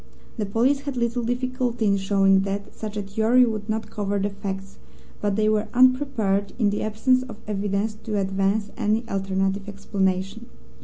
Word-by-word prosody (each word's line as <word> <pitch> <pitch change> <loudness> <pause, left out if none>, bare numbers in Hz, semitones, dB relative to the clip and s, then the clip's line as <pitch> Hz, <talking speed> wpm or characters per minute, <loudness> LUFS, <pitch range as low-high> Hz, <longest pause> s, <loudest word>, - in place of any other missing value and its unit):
The 210 - -1
police 245 +7 +2
had 280 -2 -5
little 235 0 0
difficulty 245 -1 -1
in 200 -1 +3
showing 195 0 +3
that 200 +1 -4
such 215 -1 -6
a 205 - -2
theory 220 +5 +4
would 215 -2 -3
not 220 0 -2
cover 205 -1 -1
the 200 +1 -1
facts, 195 -1 -6 0.4
but 205 -1 0
they 215 0 +2
were 215 0 +2
unprepared 250 -6 +3
in 210 -4 +2
the 205 - -2
absence 240 +4 +2
of 255 -4 -8
evidence 205 +1 -1
to 215 -2 -1
advance 195 +2 0
any 225 0 0
alternative 195 0 -1
explanation. 195 +2 -2
210 Hz, 165 wpm, -24 LUFS, 195-230 Hz, 0.4 s, theory